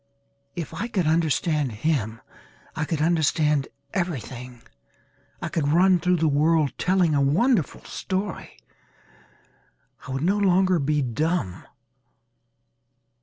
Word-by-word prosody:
If 165 -2 -5
I 200 +8 -3
could 195 -7 -1
understand 155 -3 +1
him 115 -2 -2 0.5
I 160 0 -1
could 155 -1 -1
understand 150 -3 +2 0.3
everything. 125 - -4 0.8
I - - -1
could 155 -4 -1
run 180 +4 +4
through 180 +2 +2
the 160 -2 +1
world 150 0 +2
telling 180 -3 +2
a 140 - +2
wonderful 175 - +1
story. 190 -1 -4 1.5
I - - -6
would 135 +2 -2
no 195 +4 +2
longer 185 -2 +3
be 150 0 +1
dumb. 130 - -2
160 Hz, 115 wpm, -24 LUFS, 140-180 Hz, 1.5 s, run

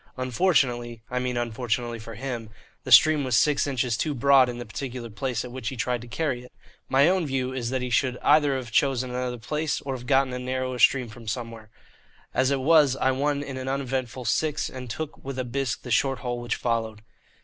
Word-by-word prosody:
Unfortunately 125 -4 +1
(I 125 - 0
mean 125 -1 -2
unfortunately 120 0 -2
for 110 0 -9
him) 120 -2 -5 0.4
the - - -5
stream 155 -2 +7
was 130 -4 +2
six 150 -1 +3
inches 125 -4 0
too 145 +6 -1
broad 135 0 +5
in 120 - -5
the 120 - -6
particular 120 +2 -6
place 125 +1 -3
at 125 - -8
which 125 -3 -4
he - - -6
tried 120 0 -1
to 120 - -10
carry 130 0 -2
it. 125 - -15 0.4
My 140 +3 +5
own 180 -3 +2
view 130 -1 -1
is 120 -3 -3
that 130 0 -2
he 125 - -4
should 125 0 +1
either 145 -2 +4
have 125 -3 -5
chosen 130 -1 +1
another 125 0 -3
place 150 +6 -2
or 135 -1 -4
else 130 - -6
have 125 - -12
got 135 -1 +4
a 125 0 -4
narrower 130 0 -3
stream 125 +1 +4
from 115 0 -12
somewhere. 115 -1 -5 0.6
As 130 0 +2
it 140 -1 0
was 150 -2 +5
I 130 0 +2
won 145 +2 0
in 135 -2 -6
an 130 0 -5
uneventful 130 -2 -3
six, 150 +7 0
and 130 -1 -8
took 155 +6 -6
with 135 -1 -6
a 130 - -1
bisque 130 0 -2
the 125 - -7
short 135 +1 +2
hole 120 0 -2
which 120 - -2
followed. 115 -2 -2
130 Hz, 220 wpm, -26 LUFS, 120-135 Hz, 0.6 s, stream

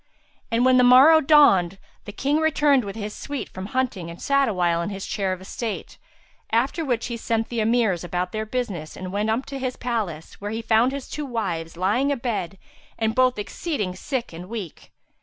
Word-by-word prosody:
And 235 +2 +2
when 255 0 +5
the 250 - +5
morrow 270 +6 +8
dawned, 195 - +5 0.3
the - - -7
King 280 +8 0
returned 295 -4 +3
with 200 0 -6
his 210 -1 -5
suite 285 -1 -5
from 185 +1 -7
hunting 220 -8 -2
and 170 - -9
sat 275 -2 +2
awhile 175 -4 +1
in 170 - -3
his 195 -1 -5
chair 195 -3 -1
of 185 - -3
estate; 210 +3 -6 0.5
after 260 +8 +1
which 245 -6 -1
he 240 - -4
sent 225 -1 -1
the 235 - -2
Emirs 220 -5 +2
about 180 +1 -2
their 215 0 -3
business 210 -10 -4
and 185 0 -6
went 210 +2 0
up 230 +4 0
to 275 -1 -6
his 255 -1 -3
palace, 210 -12 -4
where 205 - -4
he 225 +2 -4
found 225 +3 +3
his 275 -1 -6
two 300 -1 -5
wives 170 -9 -3
lying 215 +10 +1
a 280 - 0
bed 210 -7 -3 0.4
and 220 -1 0
both 255 -1 +3
exceeding 210 - -3
sick 250 - -4
and 175 +3 -9
weak. 210 -8 -7
225 Hz, 200 wpm, -24 LUFS, 190-255 Hz, 0.5 s, morrow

